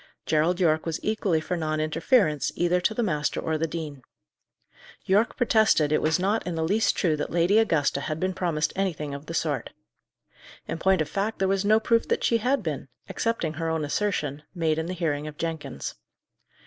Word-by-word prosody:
Gerald 160 +4 +2
Yorke 160 -2 +2
was 165 -1 -2
equally 205 -6 +1
for 180 +3 -3
non 155 -2 -1
interference, 155 - +2
either 175 +1 +1
to 220 +4 +1
the 240 - 0
master 150 -7 -1
or 160 - -1
the 165 - 0
dean. 155 -4 -6 1.0
Yorke 205 +5 +2
protested 220 - +3
it 155 - +2
was 160 +1 +2
not 200 +5 0
in 175 - -2
the 160 - -1
least 205 +7 +2
true 165 -4 +2
that 150 - -3
Lady 175 +5 +3
Augusta 155 -10 +1
had 155 +2 -3
been 185 +2 0
promised 165 -5 -1
anything 165 -7 -2
of 140 +2 -8
the 165 - -5
sort. 145 -7 -1 1.0
In - - -4
point 190 0 +3
of 155 - -1
fact, 205 +5 -2
there 190 - +1
was 195 0 +1
no 215 +2 +4
proof 230 +1 +2
that - - 0
she 230 - +3
had 250 +1 +1
been, 150 -5 -4 0.2
excepting 230 -9 -1
her 165 0 -3
own 160 -2 -1
assertion, 150 -4 -1
made 160 -2 +1
in 160 - -3
the 180 - -3
hearing 155 -4 -2
of 150 -1 -8
Jenkins. 160 - -4
165 Hz, 200 wpm, -26 LUFS, 155-195 Hz, 1.0 s, no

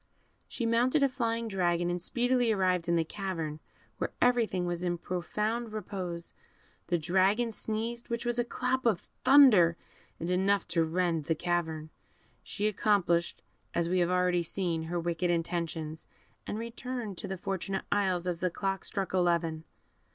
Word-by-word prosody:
She 235 - -3
mounted 245 +6 +3
a 275 - +4
flying 230 -3 -1
dragon, 175 -3 +1
and 175 0 -2
speedily 245 +3 +1
arrived 185 -4 +1
in 170 - +3
the 165 - +3
cavern, 165 -5 -4 0.4
where - - -1
everything 230 -7 +2
was 175 0 -2
in 175 -1 0
profound 210 +7 -2
repose; 185 -5 -5 0.5
the 175 +1 +2
dragon 190 +8 +2
sneezed, 225 +2 -4
which 235 0 -2
was 240 0 0
like 240 - 0
a - - -30
clap 255 0 0
of 200 -6 +2 0.2
thunder, 215 -13 +7 0.4
and 165 - -3
enough 195 +2 +2
to 165 -1 +2
rend 165 -1 0
the 160 - +1
cavern. 160 -2 -2 0.5
She 205 - -4
accomplished, 185 -5 +1 0.3
as 170 0 +1
we 185 +1 +2
have 175 0 +2
already 180 -1 +2
seen, 170 -1 -2
her 175 +1 -2
wicked 170 +1 -1
intentions, 165 -2 -2 0.4
and - - -3
returned 230 -3 -5
to - - -5
the 190 - -4
Fortunate 195 +1 -3
Isles 190 -4 +1
as 175 -2 -2
the 185 - +1
clock 195 +2 -2
struck 195 -2 -3
eleven. 170 -3 +1
185 Hz, 160 wpm, -30 LUFS, 170-220 Hz, 0.5 s, thunder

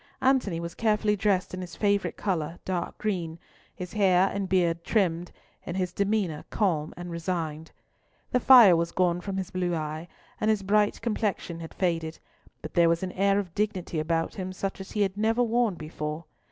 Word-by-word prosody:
Antony 255 -10 +2
was 170 0 -5
carefully 210 -2 +1
dressed 200 -3 0
in 185 - -4
his 180 -2 -8
favourite 200 -1 0
colour, 170 -4 -2
dark 180 -2 -3
green, 175 -6 -2 0.4
his 180 -1 -7
hair 190 -3 +3
and 195 -2 -3
beard 170 -3 +1
trimmed, 175 -5 0 0.3
and 175 - -5
his 180 -2 -1
demeanour 200 -6 0
calm 165 -7 0
and 175 0 -7
resigned. 165 -2 -3 0.6
The 250 - +3
fire 240 -8 +8
was 170 0 0
gone 175 -1 +1
from 195 +1 -4
his 190 0 -4
blue 180 -1 -1
eye, 155 +1 -4 0.3
and 215 - +1
his 215 -2 +1
bright 210 +1 +2
complexion 210 -7 -2
had 165 -1 -9
faded, 165 -3 -1 0.5
but 155 - -7
there 170 -1 +5
was 170 +2 +1
an 185 - -3
air 200 +2 +2
of 190 -5 -3
dignity 190 -5 -2
about 165 +1 -1
him 185 -1 -5
such 195 +1 -4
as 190 - -9
he 210 - +2
had 195 0 -2
never 225 +3 +2
worn 235 -3 +1
before. 155 0 -5
185 Hz, 185 wpm, -27 LUFS, 170-205 Hz, 0.6 s, fire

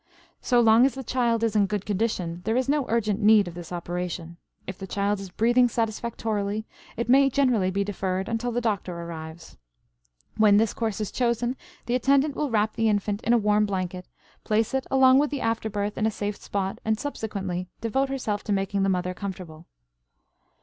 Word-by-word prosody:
So 245 - +3
long 225 +1 +6
as 275 - -5
the 265 - -6
child 235 -2 0
is 225 -2 0
in 205 -2 +4
good 205 -1 -3
condition 185 -5 -2
there 225 +2 0
is 255 - 0
no 285 -1 +1
urgent 215 -2 0
need 210 -2 +5
of 175 - -7
this 175 0 -9
operation. 175 -1 -5 0.3
If 190 0 -7
the 195 - -6
child 200 +1 -1
is 195 -1 -7
breathing 240 +6 +3
satisfactorily 220 -2 -2 0.3
it 235 - -2
may 270 +2 +5
generally 245 -8 +2
be 200 +2 0
deferred 190 -1 -2
until 235 +1 -2
the 240 +1 -1
doctor 200 -6 -2
arrives. 165 -1 -8 0.8
When 210 -2 +6
this 220 0 +2
course 220 -3 -2
is 210 - -3
chosen 240 0 0 0.3
the 240 - -2
attendant 275 +3 +2
will 295 - -1
wrap 215 -1 +1
the 225 -1 +1
infant 205 0 -1
in 235 - +2
a - - +6
warm 210 -1 +2
blanket, 185 -2 -4 0.4
place 220 +2 0
it 265 -1 -1
along 265 0 +6
with 295 0 +2
the 285 - -4
after 225 -1 -1
birth 205 0 -3
in 215 - +2
a - - +2
safe 205 -1 -4
spot, 195 -1 -3
and 220 0 0
subsequently 195 -10 -4
devote 265 +5 0
herself 220 -6 -2
to 210 - -3
making 195 0 0
the 195 - +2
mother 180 -1 -1
comfortable. 180 -4 -8
215 Hz, 195 wpm, -25 LUFS, 195-235 Hz, 0.8 s, long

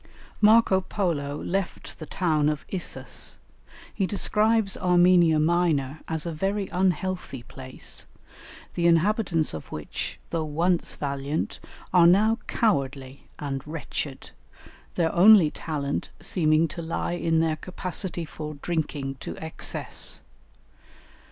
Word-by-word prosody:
Marco 210 -3 +6
Polo 155 -7 -2
left 195 0 -3
the 155 - -7
town 155 -4 +1
of 150 -1 -3
Issus; 185 -2 -3 0.6
he 195 - 0
describes 215 0 +2
Armenia 175 -2 +5
Minor 155 -4 +1
as 160 -1 -2
a 170 - -2
very 195 +5 -1
unhealthy 180 -6 -1
place, 130 +1 -6 0.7
the 170 0 +2
inhabitants 170 -1 +2
of 80 - -8
which, 75 -1 -5
though 165 -2 0
once 165 +4 0
valiant, 140 +1 -3 0.3
are 175 -2 +7
now 215 +6 +4
cowardly 140 - -1
and 140 -2 -3
wretched, 150 -3 -5 0.6
their 165 -2 +1
only 185 -3 +7
talent 145 -3 -3
seeming 155 -1 +2
to 170 +2 -6
lie 165 +1 -2
in 165 -2 +1
their 160 -1 +2
capacity 180 0 -4
for 150 0 -7
drinking 145 -3 -3
to - - -6
excess. 160 0 -4
165 Hz, 115 wpm, -26 LUFS, 150-185 Hz, 0.7 s, are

